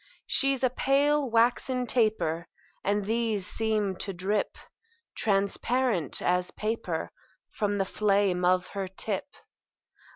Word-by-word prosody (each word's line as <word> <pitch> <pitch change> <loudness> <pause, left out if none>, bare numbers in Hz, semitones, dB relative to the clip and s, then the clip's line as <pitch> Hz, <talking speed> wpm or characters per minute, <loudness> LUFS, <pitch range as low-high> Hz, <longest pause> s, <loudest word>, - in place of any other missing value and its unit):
She's 275 -2 +2
a 255 - +3
pale, 280 +2 +2
waxen 245 +2 +2
taper; 180 -9 0 0.4
And 205 0 0
these 220 -3 0
seem 215 -3 0
to 195 - -2
drip 195 +3 -1 0.6
Transparent 200 - 0
as 180 0 +1
paper 215 -7 -3 0.4
From 205 -1 -1
the 195 - +1
flame 195 -3 +1
of 180 0 +2
her 195 -1 -4
tip. 190 +4 -4
210 Hz, 110 wpm, -28 LUFS, 190-235 Hz, 0.6 s, a